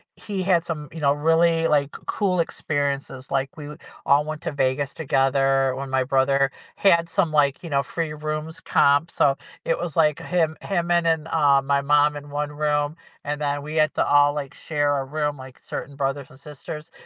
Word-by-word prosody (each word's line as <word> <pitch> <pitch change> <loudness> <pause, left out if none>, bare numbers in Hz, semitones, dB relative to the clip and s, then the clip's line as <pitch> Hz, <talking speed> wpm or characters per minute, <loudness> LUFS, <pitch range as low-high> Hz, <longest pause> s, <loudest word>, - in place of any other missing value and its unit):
he 200 -3 -5
had 175 -3 +2
some, 150 -3 -5
you 160 - -7
know, 140 -1 +4
really, 165 +2 +2
like, 145 -1 +2 0.2
cool 185 -4 0
experiences, 140 -4 -3
like, 135 0 -1
we 150 - -7
w 150 +1 -9 0.3
all 145 +1 +4
went 155 0 -5
to - - -2
Vegas 140 0 -1
together 135 -2 +2
when 135 0 -5
my 130 0 +1
brother 135 +1 +2 0.2
had 170 -4 +3
some, 165 -1 +1
like, 145 +1 +2
you 170 - -6
know, 140 -2 +2
free 160 -1 -4
rooms 155 +1 -5
comped, 145 +4 +3
so 135 -1 +2 0.3
it 165 - +1
was 175 -4 -4
like 155 -3 +3
him 165 -3 0
him 175 -3 -1
and 170 -1 +3
and, 160 -1 +1
uh, 145 -3 +4
my 140 0 +1
mom 150 +1 +3
in 145 0 -10
1 145 +1 -3
room, 150 0 0 0.3
and 145 0 -3
then, 145 -1 -1
we 150 +1 -6
had 155 0 +3
to - - +2
all, 145 0 +5
like, 145 -2 -5
share 145 -2 -1
a 135 - -3
room, 145 +1 -2
like, 130 -1 -11
certain 140 - -7
brothers 135 -1 -2
and 130 - -16
sisters, 150 +2 -9
145 Hz, 200 wpm, -23 LUFS, 140-160 Hz, 0.3 s, all